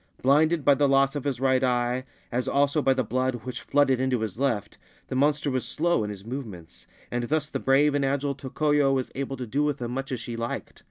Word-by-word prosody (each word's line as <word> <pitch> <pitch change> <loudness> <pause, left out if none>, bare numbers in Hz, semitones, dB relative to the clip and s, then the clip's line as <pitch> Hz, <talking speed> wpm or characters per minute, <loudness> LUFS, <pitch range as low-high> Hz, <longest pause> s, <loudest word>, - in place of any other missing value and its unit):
Blinded 150 +3 +3
by 145 - +7
the 140 +1 +2
loss 135 +1 +3
of 145 - -4
his 135 -4 -1
right 130 0 +2
eye, 125 0 0 0.3
as 125 +1 -1
also 145 +2 +2
by 135 - +3
the 130 -1 +1
blood 130 +3 -1
which 125 - -5
flooded 135 -3 +2
into 130 -3 0
his 110 +1 -4
left, 120 -7 -1 0.3
the - - -3
monster 145 +1 +2
was 130 -1 -1
slow 170 -7 0
in 105 - -3
his 100 -1 -8
movements, 110 -10 -8 0.2
and 120 0 -1
thus 150 +2 -1
the - - -3
brave 140 +2 +3
and 145 -1 +1
agile 140 +1 0
Tokoyo 140 +1 +1
was 130 -2 -1
able 135 0 -4
to 125 - -4
do 135 +6 -1
with 150 -2 0
him 120 -1 -4
much 135 +2 -4
as 130 - -2
she 115 +1 -6
liked. 115 0 -5
135 Hz, 230 wpm, -26 LUFS, 125-140 Hz, 0.3 s, by